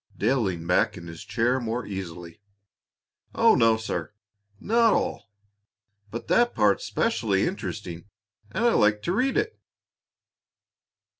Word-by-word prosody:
Dale 125 Hz, +6 st, +2 dB
leaned 85 Hz, -5 st, -3 dB
back 90 Hz, -, +2 dB
in 85 Hz, -, -9 dB
his 85 Hz, -1 st, -9 dB
chair 125 Hz, +2 st, 0 dB
more 120 Hz, 0 st, -3 dB
easily. 90 Hz, -2 st, -7 dB, 0.9 s
"Oh -, -, +5 dB
no, 115 Hz, -1 st, +4 dB
sir, 90 Hz, -6 st, -4 dB, 0.5 s
not 230 Hz, -, +3 dB
all! -, -, -2 dB, 0.8 s
But 115 Hz, +3 st, -7 dB
that 240 Hz, 0 st, +3 dB
part's 105 Hz, -2 st, +2 dB
specially 105 Hz, -4 st, 0 dB
interesting, 100 Hz, -, -5 dB, 0.4 s
and 220 Hz, -, -1 dB
I -, -, +6 dB
I -, -, +1 dB
like 105 Hz, 0 st, +3 dB
to -, -, -1 dB
read 260 Hz, -, +1 dB
it." 435 Hz, +1 st, -1 dB
110 Hz, 135 wpm, -25 LUFS, 95-130 Hz, 0.9 s, I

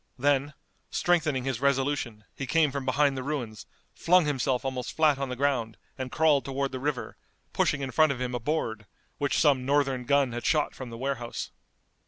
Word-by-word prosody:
Then, 140 Hz, +2 st, +1 dB, 0.3 s
strengthening 155 Hz, -7 st, +1 dB
his 130 Hz, -2 st, -2 dB
resolution, 135 Hz, -5 st, 0 dB
he 135 Hz, -, -5 dB
came 155 Hz, +1 st, +3 dB
from 140 Hz, -1 st, -4 dB
behind 140 Hz, +1 st, +2 dB
the 130 Hz, -, -3 dB
ruins, 125 Hz, -6 st, -4 dB, 0.3 s
flung 180 Hz, 0 st, +4 dB
himself 135 Hz, -3 st, 0 dB
almost 130 Hz, -2 st, -3 dB
flat 155 Hz, -3 st, +3 dB
on 140 Hz, -1 st, -2 dB
the 125 Hz, -, -3 dB
ground, 125 Hz, -5 st, 0 dB, 0.2 s
and 130 Hz, -1 st, -5 dB
crawled 155 Hz, -3 st, +3 dB
toward 135 Hz, 0 st, -2 dB
the 130 Hz, -, -4 dB
river, 140 Hz, -1 st, -3 dB, 0.4 s
pushing 140 Hz, -, +1 dB
in 135 Hz, -1 st, -3 dB
front 155 Hz, +4 st, +4 dB
of 135 Hz, -, -4 dB
him 125 Hz, -1 st, -3 dB
a 125 Hz, -, -1 dB
board, 115 Hz, -6 st, -2 dB, 0.3 s
which 140 Hz, -1 st, 0 dB
some 140 Hz, -5 st, +3 dB
Northern 135 Hz, -2 st, +1 dB
gun 140 Hz, -2 st, +3 dB
had 120 Hz, +1 st, -5 dB
shot 150 Hz, -2 st, +1 dB
from 130 Hz, -2 st, -8 dB
the 115 Hz, -, -8 dB
warehouse. 125 Hz, -2 st, -4 dB
135 Hz, 190 wpm, -28 LUFS, 125-145 Hz, 0.4 s, flung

